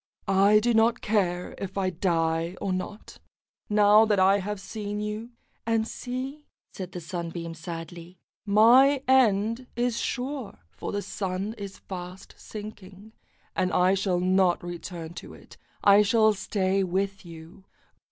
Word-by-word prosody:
"I 195 Hz, +2 st, +5 dB
do 240 Hz, +2 st, +1 dB
not 225 Hz, +1 st, +3 dB
care 180 Hz, -4 st, 0 dB
if 195 Hz, 0 st, -6 dB
I 190 Hz, -1 st, 0 dB
die 165 Hz, 0 st, 0 dB
or 195 Hz, -2 st, -2 dB
not, 185 Hz, +3 st, -6 dB, 0.5 s
now 210 Hz, +1 st, +6 dB
that 210 Hz, -3 st, +2 dB
I 195 Hz, +2 st, +5 dB
have 205 Hz, +1 st, -4 dB
seen 205 Hz, +1 st, -5 dB
you; 210 Hz, +2 st, -4 dB, 0.3 s
and 225 Hz, -1 st, 0 dB
see," 265 Hz, +5 st, -6 dB, 0.3 s
said 185 Hz, 0 st, -7 dB
the 180 Hz, -, -5 dB
Sunbeam 170 Hz, 0 st, -5 dB
sadly, 165 Hz, +2 st, -8 dB, 0.3 s
"my 250 Hz, +7 st, +5 dB
end 230 Hz, -1 st, +3 dB
is 240 Hz, -1 st, 0 dB
sure, 260 Hz, -2 st, -4 dB
for -, -, -6 dB
the 205 Hz, 0 st, -3 dB
Sun 190 Hz, +2 st, -3 dB
is 200 Hz, -3 st, -8 dB
fast 180 Hz, 0 st, -9 dB
sinking, 205 Hz, -1 st, -10 dB, 0.4 s
and 185 Hz, -, 0 dB
I 180 Hz, +1 st, +3 dB
shall 190 Hz, -2 st, 0 dB
not 185 Hz, -1 st, +2 dB
return 175 Hz, -1 st, -7 dB
to -, -, -12 dB
it, -, -, -16 dB, 0.3 s
I 200 Hz, +1 st, +7 dB
shall 215 Hz, +1 st, +4 dB
stay 195 Hz, -1 st, 0 dB
with 195 Hz, +2 st, -2 dB
you." 165 Hz, +2 st, -13 dB
195 Hz, 140 wpm, -26 LUFS, 180-215 Hz, 0.5 s, I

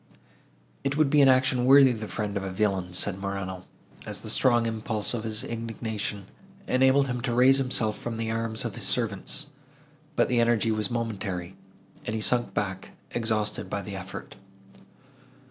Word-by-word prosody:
"It 140 Hz, +1 st, -1 dB
would 155 Hz, -3 st, +3 dB
be 150 Hz, -, +6 dB
an 135 Hz, -, +7 dB
action 130 Hz, -1 st, +3 dB
worthy 135 Hz, 0 st, +8 dB
the 110 Hz, -2 st, -4 dB
friend 105 Hz, -1 st, -3 dB
of 100 Hz, -, -1 dB
a 95 Hz, -, -4 dB
villain!" 95 Hz, -2 st, 0 dB
said 95 Hz, +2 st, -1 dB
Morano, 95 Hz, -2 st, -4 dB, 0.4 s
as -, -, -3 dB
the -, -, -3 dB
strong 120 Hz, -2 st, +3 dB
impulse 110 Hz, -1 st, -1 dB
of 115 Hz, -2 st, -3 dB
his 110 Hz, -1 st, -2 dB
indignation 110 Hz, -3 st, -4 dB, 0.4 s
enabled 130 Hz, 0 st, +4 dB
him 125 Hz, -2 st, -3 dB
to 120 Hz, -2 st, -1 dB
raise 130 Hz, +2 st, +6 dB
himself 120 Hz, -5 st, 0 dB
from 115 Hz, -1 st, -4 dB
the 115 Hz, 0 st, -2 dB
arms 115 Hz, 0 st, -2 dB
of 115 Hz, -, -3 dB
his -, -, 0 dB
servants; 110 Hz, -6 st, 0 dB, 0.7 s
but -, -, +3 dB
the 120 Hz, -1 st, +1 dB
energy 115 Hz, -1 st, +3 dB
was 110 Hz, -2 st, -1 dB
momentary, 100 Hz, -6 st, -3 dB, 0.5 s
and 105 Hz, -, -3 dB
he 110 Hz, -, -2 dB
sunk 120 Hz, +2 st, +1 dB
back, 95 Hz, -2 st, -3 dB, 0.2 s
exhausted 110 Hz, -3 st, -1 dB
by 100 Hz, -, -3 dB
the 100 Hz, +1 st, -6 dB
effort. 95 Hz, -1 st, -8 dB
110 Hz, 170 wpm, -27 LUFS, 100-125 Hz, 0.7 s, worthy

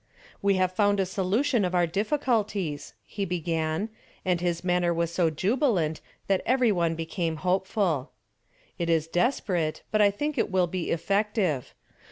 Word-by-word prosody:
"We 200 Hz, -1 st, +3 dB
have 185 Hz, -1 st, +2 dB
found 205 Hz, +1 st, +2 dB
a 190 Hz, -, +2 dB
solution 205 Hz, +7 st, +1 dB
of 180 Hz, 0 st, 0 dB
our 175 Hz, -1 st, +4 dB
difficulties," 205 Hz, -, -1 dB
he 205 Hz, -, -4 dB
began, 165 Hz, +1 st, -1 dB, 0.4 s
and 180 Hz, -2 st, +1 dB
his 175 Hz, -1 st, -1 dB
manner 180 Hz, -1 st, +2 dB
was 170 Hz, 0 st, -1 dB
so 170 Hz, -2 st, +2 dB
jubilant 185 Hz, -, 0 dB, 0.2 s
that 195 Hz, -1 st, +1 dB
every 250 Hz, -2 st, +3 dB
one 170 Hz, -4 st, +1 dB
became 165 Hz, 0 st, -2 dB
hopeful. 185 Hz, -, +1 dB, 0.7 s
"It 170 Hz, -1 st, -1 dB
is 160 Hz, -2 st, +2 dB
desperate, 175 Hz, -, 0 dB
but 215 Hz, -, +3 dB
I 205 Hz, -, +6 dB
think 290 Hz, +7 st, -2 dB
it -, -, +1 dB
will 185 Hz, -2 st, +2 dB
be 175 Hz, 0 st, -3 dB
effective. 195 Hz, -, 0 dB
185 Hz, 155 wpm, -27 LUFS, 170-205 Hz, 0.7 s, I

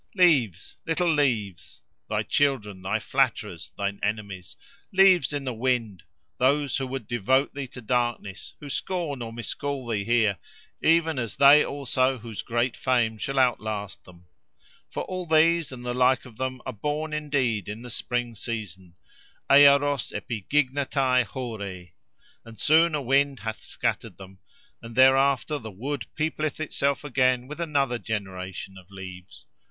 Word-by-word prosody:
+ -, -, -33 dB
Leaves! 135 Hz, -, +2 dB
little 165 Hz, 0 st, +2 dB
leaves!—thy 115 Hz, -, -2 dB
children, 110 Hz, -10 st, 0 dB
thy 95 Hz, -, 0 dB
flatterers, -, -, -1 dB
thine 100 Hz, 0 st, -2 dB
enemies! 100 Hz, -3 st, -4 dB, 0.4 s
Leaves 190 Hz, -7 st, +5 dB
in 145 Hz, -1 st, -3 dB
the 130 Hz, -2 st, -3 dB
wind, 115 Hz, -6 st, -1 dB, 0.4 s
those 140 Hz, +1 st, +2 dB
who 135 Hz, -1 st, -3 dB
would 130 Hz, -3 st, -5 dB
devote 125 Hz, +4 st, +1 dB
thee 140 Hz, -1 st, -5 dB
to 125 Hz, 0 st, -11 dB
darkness, 120 Hz, -4 st, -2 dB
who 145 Hz, -, -9 dB
scorn 150 Hz, -2 st, -3 dB
or 115 Hz, -1 st, -5 dB
miscall 130 Hz, +3 st, -4 dB
thee 110 Hz, -4 st, -1 dB
here, 110 Hz, -5 st, +2 dB, 0.4 s
even 165 Hz, -3 st, +3 dB
as 115 Hz, -3 st, -4 dB
they 140 Hz, +2 st, +7 dB
also 135 Hz, -1 st, 0 dB
whose 115 Hz, -2 st, -7 dB
great 120 Hz, +1 st, -1 dB
fame 120 Hz, -4 st, +1 dB
shall 135 Hz, +4 st, -3 dB
outlast 110 Hz, -5 st, 0 dB
them. 90 Hz, -1 st, -17 dB, 0.6 s
For -, -, -4 dB
all 185 Hz, -1 st, -5 dB
these, 160 Hz, 0 st, +3 dB
and 125 Hz, -1 st, -9 dB
the 125 Hz, -, -2 dB
like 125 Hz, +1 st, +3 dB
of 120 Hz, -4 st, -14 dB
them, 130 Hz, -1 st, -4 dB
are 130 Hz, -, -4 dB
born 150 Hz, +7 st, -3 dB
indeed 130 Hz, -, -1 dB
in 110 Hz, +3 st, -6 dB
the 125 Hz, -, -7 dB
spring 120 Hz, +1 st, -2 dB
season—Earos 120 Hz, -, +1 dB
epigignetai 130 Hz, +2 st, 0 dB
hôrê+: 100 Hz, -8 st, -6 dB, 0.5 s
and 115 Hz, -2 st, -13 dB
soon 160 Hz, +1 st, +4 dB
a 145 Hz, -, -2 dB
wind 135 Hz, +1 st, +2 dB
hath 110 Hz, -1 st, -5 dB
scattered -, -, -3 dB
them, 95 Hz, 0 st, -13 dB, 0.4 s
and 115 Hz, 0 st, -10 dB
thereafter 135 Hz, +2 st, +4 dB
the 110 Hz, -, -8 dB
wood 135 Hz, +9 st, -5 dB
peopleth 155 Hz, -1 st, -2 dB
itself 140 Hz, -3 st, -1 dB
again 130 Hz, -3 st, +1 dB
with 150 Hz, +4 st, -8 dB
another 140 Hz, -7 st, 0 dB
generation 95 Hz, -3 st, -5 dB
of 90 Hz, 0 st, -19 dB
leaves. 95 Hz, -2 st, -10 dB
125 Hz, 145 wpm, -26 LUFS, 110-140 Hz, 0.6 s, they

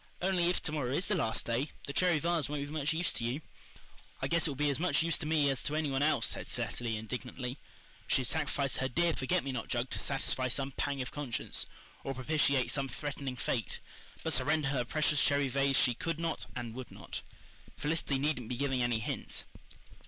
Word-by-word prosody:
"Only, 180 Hz, -2 st, +2 dB
if 180 Hz, -, 0 dB
to 150 Hz, -, -1 dB
morrow 145 Hz, -5 st, -1 dB
is 145 Hz, +8 st, 0 dB
the -, -, +3 dB
last 110 Hz, -1 st, 0 dB
day, 120 Hz, +5 st, 0 dB, 0.2 s
the 140 Hz, -, -5 dB
cherry 180 Hz, +1 st, +4 dB
vase 165 Hz, -1 st, +1 dB
won't 145 Hz, -1 st, -2 dB
be 145 Hz, -, -9 dB
much 150 Hz, -2 st, 0 dB
use 165 Hz, +2 st, +1 dB
to 120 Hz, -, -3 dB
you." 120 Hz, +5 st, -1 dB, 0.8 s
"I -, -, 0 dB
guess 170 Hz, -1 st, +3 dB
it -, -, -1 dB
will 140 Hz, -, -3 dB
be 145 Hz, +1 st, +2 dB
as 140 Hz, -, -1 dB
much 180 Hz, -1 st, +3 dB
use 165 Hz, 0 st, +2 dB
to 155 Hz, -, -3 dB
me 155 Hz, -2 st, +3 dB
as 135 Hz, -, -1 dB
to 150 Hz, -, -1 dB
any 155 Hz, -2 st, 0 dB
one 135 Hz, 0 st, +1 dB
else," 145 Hz, -5 st, +3 dB
said -, -, -1 dB
Cecily 115 Hz, -2 st, 0 dB
indignantly. 125 Hz, +3 st, -5 dB, 0.5 s
She -, -, +3 dB
had -, -, 0 dB
sacrificed 140 Hz, -2 st, 0 dB
her 130 Hz, -, +1 dB
dear 170 Hz, +6 st, +2 dB
forget 130 Hz, -3 st, +1 dB
me 135 Hz, -, -2 dB
not 125 Hz, -3 st, -3 dB
jug 120 Hz, +1 st, -1 dB
to -, -, 0 dB
satisfy 135 Hz, -2 st, +1 dB
some 135 Hz, +2 st, -1 dB
pang 140 Hz, 0 st, -1 dB
of 125 Hz, -, -7 dB
conscience, 145 Hz, -5 st, -1 dB, 0.4 s
or 135 Hz, -, -3 dB
propitiate 140 Hz, -1 st, +2 dB
some 135 Hz, -2 st, 0 dB
threatening 140 Hz, 0 st, -4 dB
fate, 120 Hz, -4 st, -2 dB, 0.4 s
but -, -, +2 dB
surrender 155 Hz, -2 st, +3 dB
her 135 Hz, -3 st, +1 dB
precious 150 Hz, +2 st, +2 dB
cherry 140 Hz, -1 st, +3 dB
vase 135 Hz, +1 st, +3 dB
she 125 Hz, -, +5 dB
could 165 Hz, +7 st, -2 dB
not 165 Hz, -1 st, -2 dB
and 120 Hz, -2 st, -4 dB
would 130 Hz, +1 st, -7 dB
not. -, -, -6 dB, 0.6 s
Felicity 150 Hz, -1 st, 0 dB
needn't 135 Hz, -4 st, 0 dB
be 125 Hz, -, -2 dB
giving 135 Hz, -1 st, +1 dB
any 120 Hz, -2 st, +2 dB
hints! 110 Hz, -, -2 dB
140 Hz, 220 wpm, -33 LUFS, 125-155 Hz, 0.8 s, she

